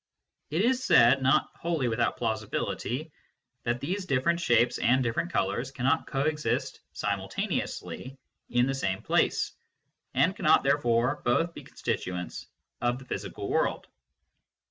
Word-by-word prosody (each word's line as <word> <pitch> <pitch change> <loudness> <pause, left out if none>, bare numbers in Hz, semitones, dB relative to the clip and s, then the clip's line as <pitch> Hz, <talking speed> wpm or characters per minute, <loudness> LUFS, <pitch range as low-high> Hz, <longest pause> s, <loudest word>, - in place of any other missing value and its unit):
It 160 +6 +1
is 255 +2 +2
said, 125 +3 +6
not 130 0 +3
wholly 165 -6 -1
without 120 +1 0
plausibility, 115 +5 -2 0.5
that 120 0 0
these 185 +8 -3
different 155 +6 +2
shapes 120 -6 +3
and 130 +2 +3
different 120 +9 -1
colours 100 - 0
cannot 135 +4 0
co 135 - -1
exist 150 +1 -1
simul - - -2
taneously 130 +2 -4 0.3
in 120 0 +3
the 135 - 0
same 100 -8 -2
place, - - +1 0.6
and - - +3
cannot - - +4
therefore 120 +4 +2
both 165 +8 +1
be - - -9
constituents 90 -1 -4 0.3
of 120 0 +1
the 130 - -12
physical - - -5
world. - - 0
130 Hz, 135 wpm, -28 LUFS, 120-150 Hz, 0.6 s, said